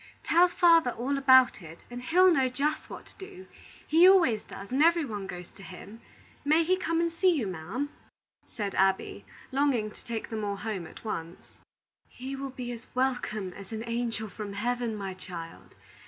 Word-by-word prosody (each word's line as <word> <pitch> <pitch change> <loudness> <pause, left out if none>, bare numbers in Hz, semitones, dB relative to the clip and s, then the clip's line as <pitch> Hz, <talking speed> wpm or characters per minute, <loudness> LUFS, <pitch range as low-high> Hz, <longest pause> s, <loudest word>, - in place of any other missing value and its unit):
"Tell 345 +2 +5
father 335 -5 +4
all 255 +4 -2
about 260 -5 +5
it, 165 0 -12
and 245 0 -6
he'll 360 +7 +5
know 265 -5 +2
just 290 +5 -1
what - - -9
to - - -17
do. 380 -1 -10 0.4
He 335 +4 +7
always 300 - +4
does, 200 - -10
and 265 +3 +1
every 335 0 +4
one 205 -6 -5
goes 180 -1 -8
to - - -16
him. 195 +4 -11 0.4
May 310 +3 +4
he 365 +3 +2
come 330 -3 -1
and 335 0 +1
see 370 +3 +2
you, 260 -8 -1
ma'am?" 190 - -4 0.6
said 205 -3 -4
Abby, 190 0 0 0.3
longing 260 -6 +1
to - - -16
take 230 -1 -5
them 220 -1 -3
all 200 -1 -2
home 200 -5 -5
at - - -14
once. 170 -5 -6 0.6
"He 265 +2 -7
will 275 0 -5
be 250 -2 -6
as 235 0 -9
welcome 245 -7 -1
as 200 +2 -11
an 220 0 -4
angel 230 -2 -2
from 205 0 -7
Heaven, 240 +2 -2
my 195 -2 -5
child. 175 -3 -9
245 Hz, 185 wpm, -28 LUFS, 200-290 Hz, 0.6 s, He